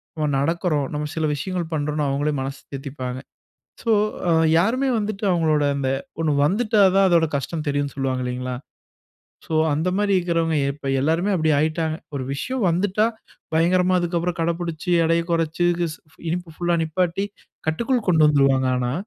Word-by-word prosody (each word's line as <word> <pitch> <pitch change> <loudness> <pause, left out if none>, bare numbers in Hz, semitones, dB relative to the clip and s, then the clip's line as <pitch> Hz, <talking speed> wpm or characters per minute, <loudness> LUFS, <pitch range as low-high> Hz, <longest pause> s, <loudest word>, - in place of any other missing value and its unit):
நம்ம 155 -2 -1
நடக்குறோம், 155 -1 0
நம்ம 150 0 -2
சில 160 -1 0
விஷயங்கள் 175 +1 -4
பண்ணுறோம்ன்னு 150 -1 -1
அவங்களே 145 +2 0
மனசு 135 +1 -5
தேத்திப்பாங்க. 130 -2 -5 0.6
சோ, 230 - +1 0.7
யாருமே 250 +9 +2
வந்துட்டு 210 0 -4
அவங்களோட 160 -4 +2
அந்த 135 -2 -1 0.3
ஒண்ணு 155 - +1
வந்துட்டா 210 +4 +2
தான் 195 -1 +5
அதோடா 170 -2 +4
கஷ்டம் 155 +3 -4
தெரியும்ன்னு 145 -1 -1
சொல்லுவாங்க 130 -2 -1
இல்லைங்களா? 125 0 -3 0.9
சோ, - - -7 0.2
அந்த 160 +5 0
மாரி 205 -1 +1
இருக்கிறவங்க 165 -2 0 0.2
இப்ப 145 -2 -7
எல்லாருமே 165 +8 +1
அப்படி 155 -1 +1
ஆயிட்டாங்க. 160 +1 0 0.2
ஒரு 130 - -3
விசயம் 250 - -2
வந்துட்டா 200 +5 +1 0.5
பயங்கரமா 180 +3 +3
அதுக்கப்புறம் 175 0 -1
கடைப்புடிச்சு, 170 +1 -2
எடையை 165 +1 +2
குறைச்சு, 165 +1 +1
க்ஸ் 165 -2 -2 0.3
இனிப்பு 175 -1 -4
ஃபுல்‌லா 175 -1 +1
நிப்பாட்டி, 180 +4 -1 0.4
கட்டுக்குள் 235 +8 0
கொண்டு 160 -3 +5
வந்துருவாங்க 135 -3 +3
ஆனா. 125 -1 -1
165 Hz, 145 wpm, -22 LUFS, 145-180 Hz, 0.9 s, தான்